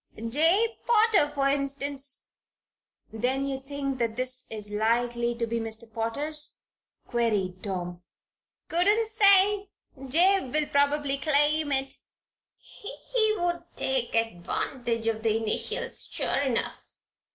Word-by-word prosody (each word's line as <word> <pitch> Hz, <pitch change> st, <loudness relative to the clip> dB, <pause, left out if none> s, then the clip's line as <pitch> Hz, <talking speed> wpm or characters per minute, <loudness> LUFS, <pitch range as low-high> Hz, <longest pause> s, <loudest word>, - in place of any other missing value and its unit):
"Jabe 325 Hz, -, +2 dB
Potter, 440 Hz, -9 st, +4 dB
for 275 Hz, -1 st, 0 dB
instance." 275 Hz, 0 st, 0 dB, 0.9 s
"Then 255 Hz, +5 st, -1 dB
you 270 Hz, -1 st, -3 dB
think 275 Hz, -1 st, -4 dB
this 255 Hz, +2 st, -1 dB
is 210 Hz, -2 st, -3 dB
likely 235 Hz, +2 st, 0 dB
to 235 Hz, 0 st, -1 dB
be 230 Hz, 0 st, -2 dB
Mr. 225 Hz, 0 st, -3 dB
Potter's?" 290 Hz, +8 st, -2 dB, 0.5 s
queried 205 Hz, -6 st, -1 dB
Tom. 180 Hz, -3 st, -5 dB, 0.7 s
"Couldn't 410 Hz, +7 st, +2 dB
say. 405 Hz, -2 st, +4 dB, 0.4 s
Jabe 355 Hz, +2 st, +3 dB
will 305 Hz, +1 st, +1 dB
probably 285 Hz, 0 st, +1 dB
claim 295 Hz, +1 st, +3 dB
it. 270 Hz, 0 st, 0 dB, 0.6 s
He 435 Hz, 0 st, -2 dB
would 345 Hz, -1 st, -1 dB
take 260 Hz, -3 st, -1 dB
advantage 230 Hz, +3 st, -1 dB
of 225 Hz, -1 st, -1 dB
the 220 Hz, -1 st, +1 dB
initials, 225 Hz, -, -2 dB
sure -, -, -2 dB
enough." 260 Hz, -4 st, -1 dB
275 Hz, 110 wpm, -27 LUFS, 230-315 Hz, 0.9 s, Potter